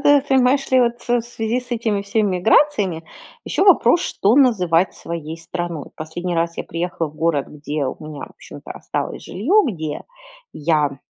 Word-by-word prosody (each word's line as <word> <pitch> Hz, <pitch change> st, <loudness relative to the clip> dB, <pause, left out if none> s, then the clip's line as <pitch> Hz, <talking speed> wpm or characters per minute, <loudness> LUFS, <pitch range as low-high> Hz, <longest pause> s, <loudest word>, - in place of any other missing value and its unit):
т 290 Hz, -1 st, +5 dB
понимаешь 265 Hz, +1 st, +3 dB
ли, 260 Hz, -1 st, +5 dB
вот 240 Hz, 0 st, +1 dB
в 240 Hz, 0 st, +2 dB
связи 235 Hz, +1 st, -2 dB
с 250 Hz, -, -11 dB
этими 225 Hz, -4 st, 0 dB
всеми 200 Hz, -2 st, 0 dB
миграциями 200 Hz, -, +2 dB, 0.4 s
ещё -, -, 0 dB
вопрос: 340 Hz, -, +5 dB
что 205 Hz, +4 st, +1 dB
называть 185 Hz, -, +3 dB
своей 165 Hz, -1 st, -6 dB
страной? 170 Hz, -2 st, -5 dB
Последний 175 Hz, +3 st, -4 dB
раз 170 Hz, 0 st, -1 dB
я -, -, -4 dB
приехала 170 Hz, 0 st, -3 dB
в 150 Hz, -, -17 dB
город, 155 Hz, -3 st, 0 dB
где 150 Hz, 0 st, -4 dB
у 130 Hz, -, -2 dB
меня, 150 Hz, -2 st, -7 dB
в -, -, -17 dB
общем-то, -, -, -13 dB
осталось -, -, -4 dB
жилье, 330 Hz, -, +2 dB
где 155 Hz, -8 st, -4 dB, 0.5 s
я 150 Hz, -3 st, 0 dB
180 Hz, 165 wpm, -20 LUFS, 160-240 Hz, 0.5 s, т